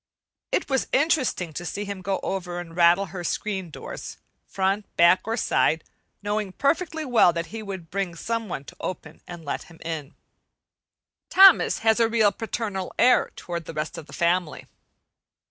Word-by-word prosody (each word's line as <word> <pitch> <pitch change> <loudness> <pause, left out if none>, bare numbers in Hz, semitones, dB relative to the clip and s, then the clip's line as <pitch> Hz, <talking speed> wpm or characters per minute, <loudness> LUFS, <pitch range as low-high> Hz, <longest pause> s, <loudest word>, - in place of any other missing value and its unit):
It - - 0
was 270 -2 0
interesting 265 - +1
to 170 - -5
see 200 +4 -4
him 200 -1 -6
go 190 0 -1
over 180 -2 -3
and 165 -2 -9
rattle 175 +3 +5
her 180 -2 -5
screen 190 -1 -3
doors, 155 - -8 0.3
front, 195 +2 -1
back, 170 +2 +6
or 225 +1 -1
side, 160 -7 +2 0.4
knowing 205 -2 -2
perfectly 315 - 0
well 240 -8 +5
that 170 0 -2
he 225 - -5
would 190 -6 -7
bring 190 -2 -2
some 225 +4 -3
one 140 - -4
to - - -12
open 160 -3 -6
and 170 -2 -9
let 140 - -4
him 165 - -16
in. 160 -3 -5 1.1
Thomas 385 -2 +7
has 220 +1 +4
a 230 -1 +3
really 220 -3 +4
paternal 210 -4 -4
air 250 -1 +4
toward 170 -2 -5
the 160 - -8
rest 150 - -3
of 155 - -9
the - - -13
family. 175 -2 0
190 Hz, 170 wpm, -25 LUFS, 170-225 Hz, 1.1 s, Thomas